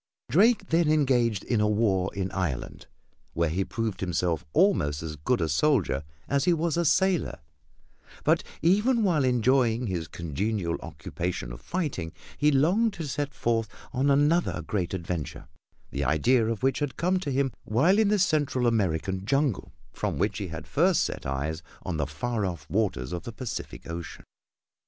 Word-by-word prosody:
Drake 215 +3 +4
then 165 -1 +3
engaged 125 -9 +2
in 115 -4 0
a 105 - +3
war 100 -4 +1
in 95 -1 -2
Ireland, 90 -10 -3 0.5
where 85 -1 +1
he 95 +4 0
proved 110 -2 -3
himself 90 -3 -1
almost 80 - +2
as 80 -2 -5
good 75 - 0
a 80 - +1
soldier 85 - +2 0.3
as 140 0 +1
he 180 - +4
was 165 -1 0
a 170 0 +1
sailor; 185 +3 +2 0.9
but - - +3 0.2
even 215 +7 +3
while 170 -8 +2
enjoying 125 -1 +2
his 90 -6 -3
congenial 85 +3 -2
occupation 85 -9 -5
of - - -10
fighting 145 - -3 0.2
he 150 - +3
longed 185 +11 +3
to 160 -3 -5
set 145 +1 -2
forth 115 -4 0 0.2
on 135 +2 +2
another 145 +5 +2
great 95 -3 -2
adventure, 85 -3 -5 0.4
the 70 - -2
idea 110 - +3
of 115 +1 -3
which 135 +1 +2
had 145 -5 -3
come 185 +3 +1
to 160 - -4
him 135 0 +1
while 160 - +3
in 220 - +4
the 210 +1 +3
Central 150 -8 +1
American 95 -4 0
jungle 135 0 0 0.2
from - - -2
which 100 +2 0
he 100 - -3
had 80 -2 -7
first - - +3
set - - -4
eyes 75 +4 -2 0.2
on 90 -4 -3
the 70 -2 -1
far 105 - -2
off 85 -5 -4
waters 90 - 0
of 90 - -3
the 115 - -7
Pacific 120 0 -6
Ocean. 85 -1 -7
115 Hz, 170 wpm, -27 LUFS, -, 0.9 s, Drake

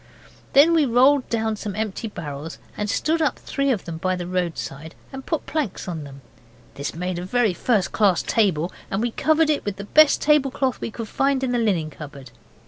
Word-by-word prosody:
Then 300 +5 +7
we 315 -4 +3
rolled 255 +3 +4
down 220 -2 -1
some 205 -2 -5
empty 215 +1 -3
barrels 155 -5 -7 0.2
and 210 0 -3
stood 320 +8 0
up 305 - +1
three 275 0 -2
of 230 -8 0
them 165 -1 -5
by 185 +2 0
the 180 -1 -5
roadside, 170 -4 -4 0.2
and 270 0 -7
put 320 - -2
planks 290 - -3
on 165 -4 -5
them. 140 -1 -12 0.5
This 140 +2 -5
made 180 +1 -3
a - - -5
very 220 +1 +1
first 210 0 0
class 200 -5 +2
table, 185 -6 +1 0.2
and 195 - -1
we 240 - 0
covered 315 +4 +2
it 295 - -1
with 205 -2 -3
the 200 - -7
best 305 +8 +5
tablecloth 275 -3 +1
we - - -3
could 225 0 -6
find 270 +2 0
in 255 - 0
the 245 - +1
linen 180 -9 0
cupboard. 140 -4 -10
215 Hz, 205 wpm, -23 LUFS, 175-270 Hz, 0.5 s, Then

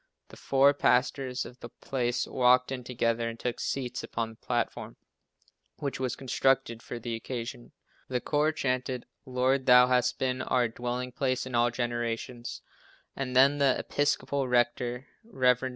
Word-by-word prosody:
The - - -12
four 135 +1 +4
pastors 130 -1 +1
of 125 +1 -12
the 120 - -9
place 120 -1 -2
walked 125 0 +3
in 130 -2 -4
together 115 -1 0
and 115 0 -8
took 125 -1 -3
seats 125 -2 -3
upon 115 -1 -3
the - - -15
platform, 120 0 -3 0.8
which 140 -3 -4
was 130 -2 -1
constructed 135 -2 +1
for 120 - -7
the 115 0 -5
occasion. 120 +1 -6 0.4
The 125 -1 -1
choir 150 +4 +1
chanted 130 -4 -2 0.2
"Lord, 130 +1 +1
Thou 125 0 +8
hast 125 -1 +2
been 130 -1 -1
our 125 -2 +2
dwelling 125 +2 -4
place 130 0 -1
in 130 - -8
all 120 0 +3
generations," 120 0 -3 0.5
and 130 -2 -4
then 140 +3 +5
the 135 -2 +3
Episcopal 140 -1 0
rector, 120 +1 0 0.2
Rev. 130 - +2
Mr. 130 - -3
125 Hz, 155 wpm, -29 LUFS, 120-130 Hz, 0.8 s, Thou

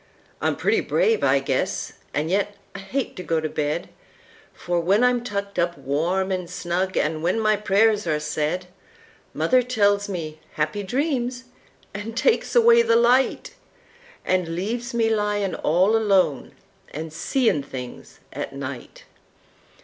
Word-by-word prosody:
I'm - - +1
pretty - - +1
brave 455 -3 +1
I - - +4
guess; - - -2 0.2
an' 150 +2 -1
yet 205 +2 0 0.2
I 195 - -7
hate 235 +8 -3
to - - -4
go 165 -2 0
to 155 - -2
bed, 150 -1 -2 0.6
For, 175 0 -2
when 195 +7 +2
I'm 250 -1 +3
tucked 200 -4 -4
up 170 0 0
warm 175 +7 -1
an 180 -2 -2
snug 180 +3 -2
an' 155 +1 0
when 180 +7 +1
my 215 -1 +3
prayers 210 0 +2
are 155 -1 +1
said, 155 +4 -2 0.7
Mother 255 0 +3
tells 205 -4 +1
me 155 -5 -5
"Happy 155 +7 -1
Dreams" 250 +2 -1 0.5
an' 205 +3 -6
takes 455 - +1
away 470 0 +7
the 230 - +3
light, 245 +3 +2 0.7
An' 180 -3 0
leaves 230 +7 -3
me 230 -1 +2
lyin' 210 -2 0
all 185 +7 +2
alone 190 - +2 0.4
an' 155 +2 -6
seein' 225 - +1
things 130 -3 -9
at - - -5
night! 140 -2 -7
195 Hz, 145 wpm, -23 LUFS, 165-225 Hz, 0.7 s, away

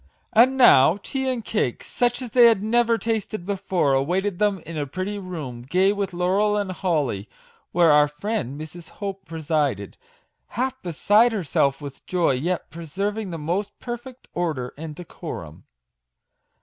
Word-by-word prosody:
And 255 +4 +5
now 165 - +7
tea 265 -1 -2
and 240 -4 -3
cake, 170 - -1
such 245 +1 -1
as 240 - -7
they 245 0 +7
had 225 -4 +5
never 235 +1 +3
tasted 220 -4 -3
before, 190 -7 0
awaited 180 +8 0
them 205 -2 +2
in 165 - -7
a 145 -2 -2
pretty 185 +7 -4
room, 155 -11 -6
gay 185 +10 +2
with 200 -1 -2
laurel 190 +4 +1
and 200 -2 -1
holly, 150 - -1 0.4
where 170 -2 +5
our 150 0 +6
friend 150 - -4
Mrs. 160 +2 -9
Hope 195 -1 -5
presided, 150 - -2 0.6
half 260 +1 -1
beside 205 +7 +3
herself 145 -7 0
with 140 -2 -9
joy, 180 -4 +2
yet 165 +8 -2
preserving 195 +6 -3
the 170 - -5
most 180 +7 -3
perfect 240 +1 -8
order 155 -8 -2
and 155 0 -7
decorum. 155 - -8
185 Hz, 150 wpm, -24 LUFS, 150-210 Hz, 0.6 s, now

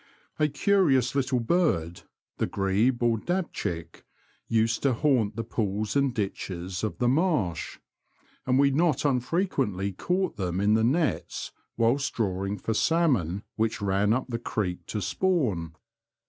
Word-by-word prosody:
A 150 - +4
curious 145 - +2
little 130 -2 +1
bird, 110 - 0 0.4
the - - +1
grebe 105 +6 +1
or 115 -2 +2
dabchick, 90 - -3 0.4
used 115 0 +1
to 135 -2 +2
haunt 115 -5 +1
the 115 - -3
pools 105 0 -2
and 140 -1 +3
ditches 95 -4 -4
of 100 -6 -2
the 120 - +1
marsh, 135 - 0 0.7
and 130 0 +3
we 140 0 +4
not 155 +2 +1
unfrequently 130 - 0
caught 180 - -1
them 90 -2 -2
in 105 +2 +3
the 110 0 +3
nets 120 - 0 0.3
whilst 120 +5 +1
drawing 100 -2 -1
for 110 - -2
salmon 110 - +1
which 110 0 0
ran 100 +1 +1
up 125 +3 +1
the 115 -2 -3
creek 90 -7 -3
to 105 -3 -3
spawn. 105 - 0
115 Hz, 140 wpm, -27 LUFS, 95-140 Hz, 0.7 s, A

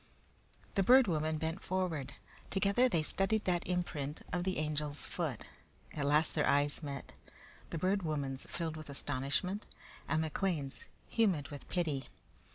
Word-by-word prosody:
The 195 - +2
Bird 255 +6 +7
Woman 155 -3 0
bent 160 +3 -2
forward. 165 -7 -2 0.4
Together 200 +6 +3
they 165 -8 +2
studied 200 +6 +4
that 175 -2 +1
imprint 160 -5 -2
of 175 -1 0
the 190 -1 0
Angel's 150 -1 -1
foot. - - -3 0.5
At 145 -2 -1
last 150 +2 +3
their 150 - +2
eyes 145 +2 +2
met, 140 -3 -6 0.6
the - - -3
Bird 190 +4 +1
Woman's 140 -5 -3
filled 160 -2 -3
with 155 -1 -8
astonishment, 140 +8 0 0.4
and 155 - +1
McLean's 160 -3 -2 0.2
humid 190 -11 +2
with 145 -1 -9
pity. 155 -7 -1
160 Hz, 145 wpm, -34 LUFS, 145-185 Hz, 0.6 s, Bird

